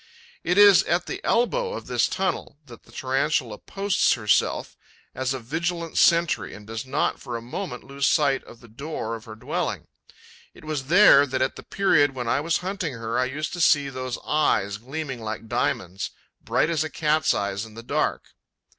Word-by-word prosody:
It 180 Hz, +2 st, 0 dB
is 205 Hz, -2 st, +8 dB
at 175 Hz, +1 st, 0 dB
the -, -, -6 dB
elbow 470 Hz, -, +1 dB
of -, -, -6 dB
this -, -, +1 dB
tunnel 185 Hz, -6 st, -2 dB
that 120 Hz, -3 st, -14 dB
the -, -, -19 dB
Tarantula 130 Hz, -2 st, -1 dB
posts 200 Hz, 0 st, +1 dB
herself 105 Hz, -4 st, 0 dB, 0.4 s
as 130 Hz, 0 st, -2 dB
a 135 Hz, -, -1 dB
vigilant 165 Hz, +6 st, -3 dB
sentry 170 Hz, -1 st, +3 dB
and 105 Hz, -, -12 dB
does 115 Hz, +3 st, -6 dB
not -, -, 0 dB
for 120 Hz, -3 st, -5 dB
a -, -, -5 dB
moment 125 Hz, +1 st, -6 dB
lose 140 Hz, +1 st, -1 dB
sight 140 Hz, -4 st, +2 dB
of 120 Hz, -, -14 dB
the 120 Hz, -, -14 dB
door 115 Hz, 0 st, -5 dB
of 115 Hz, 0 st, -7 dB
her 110 Hz, -2 st, -9 dB
dwelling; 110 Hz, -, -3 dB, 0.7 s
it -, -, -15 dB
was 150 Hz, -4 st, -3 dB
there 165 Hz, -5 st, +7 dB
that, 130 Hz, -1 st, 0 dB
at 130 Hz, -, -2 dB
the -, -, -9 dB
period 145 Hz, -8 st, +2 dB
when 125 Hz, -2 st, -4 dB
I 115 Hz, -, +2 dB
was 165 Hz, +2 st, +1 dB
hunting 185 Hz, -6 st, -3 dB
her, 115 Hz, 0 st, -3 dB
I 130 Hz, -, +2 dB
used 150 Hz, +4 st, -4 dB
to 175 Hz, -, -3 dB
see 145 Hz, -3 st, +4 dB
those 130 Hz, -2 st, -4 dB
eyes 105 Hz, -9 st, +1 dB
gleaming 135 Hz, +1 st, -6 dB
like 110 Hz, +1 st, -5 dB
diamonds, 95 Hz, -5 st, -2 dB, 0.3 s
bright -, -, +1 dB
as 160 Hz, -2 st, +1 dB
a 155 Hz, -, -4 dB
cat's 155 Hz, -1 st, +1 dB
eyes 100 Hz, 0 st, -2 dB
in 110 Hz, -1 st, -11 dB
the 115 Hz, -, -9 dB
dark. -, -, -1 dB
135 Hz, 190 wpm, -24 LUFS, 115-160 Hz, 0.7 s, is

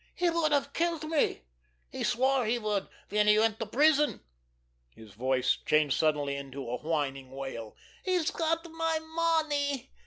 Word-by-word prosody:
He 350 Hz, -2 st, +1 dB
would 330 Hz, -2 st, +1 dB
have 280 Hz, -1 st, +1 dB
killed 335 Hz, -2 st, 0 dB
me. 310 Hz, -, 0 dB, 0.5 s
He -, -, -4 dB
swore 265 Hz, +1 st, +2 dB
he 235 Hz, +2 st, +2 dB
would 210 Hz, -3 st, -1 dB, 0.2 s
when 210 Hz, +1 st, +2 dB
he 210 Hz, 0 st, +6 dB
went 220 Hz, 0 st, +2 dB
to 225 Hz, -, -3 dB
prison." 295 Hz, 0 st, +3 dB, 0.7 s
His 110 Hz, -2 st, -14 dB
voice 130 Hz, +3 st, +1 dB
changed 155 Hz, -3 st, +3 dB
suddenly 145 Hz, -3 st, +1 dB
into 140 Hz, -1 st, -7 dB
a 125 Hz, +1 st, -2 dB
whining 140 Hz, -4 st, -2 dB
wail. 135 Hz, -5 st, -7 dB, 0.3 s
"He's 365 Hz, -4 st, +1 dB
got 330 Hz, 0 st, -1 dB
my 325 Hz, 0 st, 0 dB
money! 315 Hz, -4 st, 0 dB
235 Hz, 155 wpm, -29 LUFS, -, 0.7 s, he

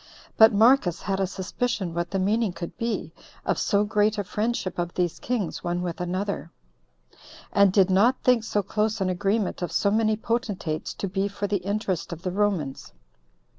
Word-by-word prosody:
But 220 Hz, 0 st, +8 dB
Marcus 210 Hz, -4 st, +4 dB
had 195 Hz, -1 st, -1 dB
a 190 Hz, -, +1 dB
suspicion 190 Hz, 0 st, -3 dB
what 170 Hz, 0 st, -2 dB
the 195 Hz, -, -2 dB
meaning 205 Hz, +1 st, +1 dB
could 170 Hz, -1 st, -7 dB
be 230 Hz, 0 st, -3 dB, 0.3 s
of -, -, 0 dB
so 205 Hz, -1 st, +2 dB
great 210 Hz, +1 st, +1 dB
a 205 Hz, -, -1 dB
friendship 210 Hz, -2 st, -2 dB
of 175 Hz, 0 st, -3 dB
these 175 Hz, -2 st, -1 dB
kings 235 Hz, -8 st, -2 dB
one 175 Hz, 0 st, -1 dB
with 175 Hz, -1 st, -4 dB
another, 185 Hz, 0 st, -3 dB, 1.0 s
and 200 Hz, -1 st, +5 dB
did 195 Hz, -1 st, +4 dB
not 225 Hz, +8 st, +4 dB
think 250 Hz, -3 st, +4 dB
so 205 Hz, -2 st, -1 dB
close 215 Hz, +3 st, -1 dB
an 190 Hz, -1 st, 0 dB
agreement 200 Hz, +2 st, -1 dB
of 175 Hz, -, -2 dB
so 200 Hz, -, +2 dB
many 220 Hz, 0 st, +2 dB
potentates 210 Hz, -9 st, -3 dB
to 195 Hz, -, -3 dB
be 195 Hz, +1 st, -1 dB
for 205 Hz, 0 st, -4 dB
the 200 Hz, 0 st, 0 dB
interest 195 Hz, -1 st, -2 dB
of 170 Hz, +1 st, -7 dB
the 185 Hz, -, -2 dB
Romans. 185 Hz, -9 st, -1 dB
200 Hz, 180 wpm, -25 LUFS, 180-215 Hz, 1.0 s, But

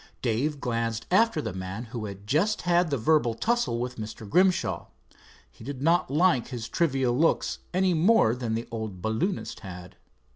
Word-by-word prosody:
Dave 135 Hz, +5 st, 0 dB
glanced 115 Hz, -2 st, -2 dB
after 195 Hz, -5 st, +3 dB
the -, -, -4 dB
man 95 Hz, +4 st, -5 dB
who 115 Hz, -3 st, -3 dB
had 100 Hz, -1 st, -8 dB
just 175 Hz, -, +1 dB
had 175 Hz, -1 st, +3 dB
the 140 Hz, -, 0 dB
verbal 120 Hz, -1 st, +2 dB
tussle 235 Hz, -, 0 dB
with 125 Hz, +1 st, -4 dB
Mr. 110 Hz, 0 st, -7 dB
Grimshaw. 185 Hz, -, +2 dB, 0.6 s
He -, -, -15 dB
did 135 Hz, +1 st, -6 dB
not 170 Hz, 0 st, +3 dB
like 150 Hz, -4 st, +3 dB
his 120 Hz, -4 st, -5 dB
trivial 135 Hz, -4 st, +1 dB
looks 165 Hz, +5 st, +1 dB
any 185 Hz, 0 st, +2 dB
more 165 Hz, -, +4 dB
than 120 Hz, -3 st, -2 dB
the 115 Hz, -, -4 dB
old 110 Hz, -5 st, -5 dB
balloonist 110 Hz, -, -2 dB
had. 90 Hz, -2 st, -10 dB
125 Hz, 170 wpm, -27 LUFS, 110-170 Hz, 0.6 s, more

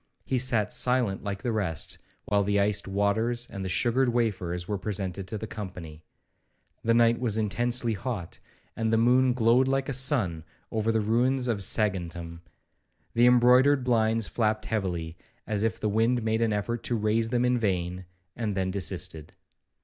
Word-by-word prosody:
He 130 Hz, -, 0 dB
sat 115 Hz, -5 st, +1 dB
silent 125 Hz, -6 st, +1 dB
like 100 Hz, -1 st, -5 dB
the 120 Hz, -, -1 dB
rest, 100 Hz, -7 st, -2 dB, 0.3 s
while 100 Hz, 0 st, +2 dB
the 100 Hz, +1 st, +1 dB
iced 100 Hz, 0 st, +1 dB
waters 110 Hz, +5 st, 0 dB
and 100 Hz, -, -5 dB
the 95 Hz, -, -3 dB
sugared 120 Hz, +6 st, +2 dB
wafers 95 Hz, -7 st, -1 dB
were 105 Hz, -2 st, -2 dB
presented 95 Hz, -2 st, -4 dB
to 110 Hz, -, -4 dB
the 110 Hz, -, -5 dB
company. 90 Hz, -8 st, -8 dB, 0.8 s
The 115 Hz, 0 st, +2 dB
night 115 Hz, 0 st, +4 dB
was 115 Hz, -4 st, -1 dB
intensely 120 Hz, +3 st, 0 dB
hot, 105 Hz, -5 st, -5 dB, 0.4 s
and 110 Hz, -1 st, -1 dB
the 115 Hz, -, +3 dB
moon 125 Hz, +2 st, +4 dB
glowed 120 Hz, +2 st, +3 dB
like 135 Hz, +1 st, 0 dB
a -, -, -1 dB
sun 120 Hz, -, +1 dB, 0.3 s
over 110 Hz, 0 st, 0 dB
the 110 Hz, -1 st, +1 dB
ruins 125 Hz, +4 st, +1 dB
of 115 Hz, -4 st, 0 dB
Saguntum; 85 Hz, -5 st, 0 dB, 0.7 s
the 120 Hz, +1 st, +4 dB
embroidered 125 Hz, +3 st, +5 dB
blinds 115 Hz, -3 st, +1 dB
flapped 110 Hz, -2 st, -1 dB
heavily, 90 Hz, -7 st, -3 dB, 0.3 s
as 105 Hz, -2 st, -2 dB
if 115 Hz, +1 st, -1 dB
the 110 Hz, -, -1 dB
wind 115 Hz, +3 st, +1 dB
made 110 Hz, +1 st, 0 dB
an 115 Hz, -1 st, +2 dB
effort 110 Hz, +3 st, -2 dB
to 120 Hz, -, +1 dB
raise 110 Hz, +1 st, 0 dB
them 120 Hz, 0 st, +1 dB
in 125 Hz, 0 st, +2 dB
vain, 90 Hz, -3 st, -2 dB, 0.3 s
and 105 Hz, -4 st, -3 dB
then 95 Hz, -1 st, 0 dB
desisted. 80 Hz, -5 st, -3 dB
110 Hz, 170 wpm, -27 LUFS, 100-120 Hz, 0.8 s, embroidered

